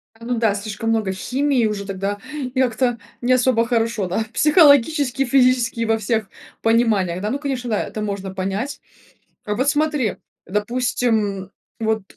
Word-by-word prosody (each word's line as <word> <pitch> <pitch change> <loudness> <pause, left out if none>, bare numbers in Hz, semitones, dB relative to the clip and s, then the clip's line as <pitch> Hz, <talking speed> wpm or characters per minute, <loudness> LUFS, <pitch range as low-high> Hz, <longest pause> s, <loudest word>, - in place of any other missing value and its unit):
А, 230 - -13
ну 245 0 -1
да, 215 -3 +2
слишком 215 +2 -4
много 220 -4 +1
химии 255 +4 0
уже 205 -1 -4
тогда, 195 +1 -3 0.2
и 260 -3 -3
как-то 245 -1 +1 0.2
не 250 +1 +3
особо 250 -2 +3
хорошо, 230 -4 0
да, 205 +5 -1
психологически 290 -4 +4
и - - -4
физически 250 -2 +2
и - - +1
во 225 0 +2
всех 220 -1 -1 0.3
пониманиях. 215 -6 +2
Да, 210 - -2
ну 275 +4 -2
конечно, 265 -4 -3
да, 215 - 0
это 215 - -6
можно 200 -2 -4
понять. 195 +9 -3 0.7
Вот 230 +7 0
смотри, 295 -7 0 0.3
допустим, 210 -2 -1 0.3
вот 220 -2 0
230 Hz, 160 wpm, -21 LUFS, 210-255 Hz, 0.7 s, психологически